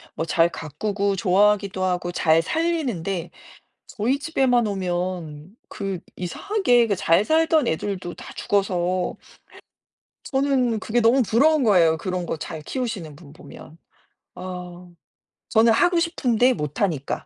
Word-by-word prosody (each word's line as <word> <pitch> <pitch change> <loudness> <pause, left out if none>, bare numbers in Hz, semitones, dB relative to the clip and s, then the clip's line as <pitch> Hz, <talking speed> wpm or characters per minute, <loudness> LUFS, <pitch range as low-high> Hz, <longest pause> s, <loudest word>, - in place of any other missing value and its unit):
뭐 160 - -2
잘 165 +1 +2
가꾸고 195 +6 -3
좋아하기도 195 +1 +2
하고 180 -1 -1
잘 165 -2 +3
살리는데 215 - -2 0.6
저희 240 +6 -1
집에만 265 -6 +1
오면 180 -3 -4
그 195 -3 -4 0.2
이상하게 245 - +1
그 205 - 0
잘 170 +3 +2
살던 320 +1 +2
애들도 180 +1 -3
다 - - -11
죽어서 185 -2 -1 1.1
저는 265 -4 0
그게 230 +3 0
너무 235 +4 +4
부러운 280 +7 +3
거예요 175 -7 +4
그런 180 0 -3
거 165 - -3
잘 155 0 -7
키우시는 200 - -5
분 145 -2 -15
보면. 160 0 -14 0.6
어 180 -1 -8 0.6
저는 230 -1 +4
하고 350 +8 +3
싶은데 255 -7 +2
못 150 - -5
하니까. 160 -9 -2
195 Hz, 260 characters per minute, -23 LUFS, 175-245 Hz, 1.1 s, 너무